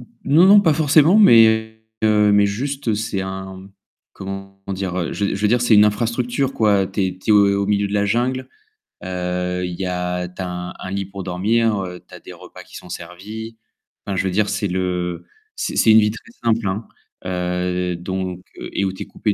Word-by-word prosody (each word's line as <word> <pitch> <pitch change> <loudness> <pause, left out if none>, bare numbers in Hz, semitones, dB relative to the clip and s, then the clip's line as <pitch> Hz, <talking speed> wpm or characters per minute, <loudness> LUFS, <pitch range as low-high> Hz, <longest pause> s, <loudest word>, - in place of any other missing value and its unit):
N 120 - -13 0.2
non 160 +6 +5
non 205 +1 +8
pas 165 -5 +3
forcément 155 +5 +4
mais 110 - +5 0.2
heu, 105 -1 +4
mais 100 0 +4
juste 125 +3 -2
c'est 110 -2 -3
un 95 0 -7 0.4
comment 95 0 -8
dire, 95 -2 -3
heu? 85 - -2
Je 100 -1 -1
je 100 - -5
veux 105 - +3
dire 120 +1 +2
c'est 120 -2 +4
une 105 0 +7
infrastructure 120 +5 0
quoi, 100 -5 +2
tu 95 +1 -2
es 95 0 -6
tu 95 - -3
es 100 -1 +5
au 100 0 0
milieu 100 0 +1
de 100 - -6
la 100 0 +2
jungle. 125 +5 -1 0.6
Heu, 90 0 -3
il 90 -1 -5
y 95 - -2
a, 90 0 -2
tu 90 +2 -9
as 90 - -3
un 90 0 -6
un 95 - -7
lit 100 0 -2
pour 95 0 -8
dormir, 105 +5 +1
heu, 90 -1 -7
tu - - -20
as - - -11
des - - -12
repas - - -13
qui - - -16
sont 90 - -12
servis, 105 +7 -8 0.5
enfin 100 - -3
je 95 - 0
veux 95 - -1
dire 105 +2 +1
c'est 100 - -1
le 90 -1 -3 0.3
c'est - - -3
c'est 110 - +5
une 110 - +8
vie 105 -1 +2
très 175 - -12
simple 115 -2 +1
hein. 100 +4 -3 0.4
Heu 90 0 -2
donc 90 0 -4 0.2
et 100 - -3
où 95 - -2
tu 95 - -6
es - - -12
coupé 105 - -2
100 Hz, 215 wpm, -20 LUFS, 90-110 Hz, 0.6 s, non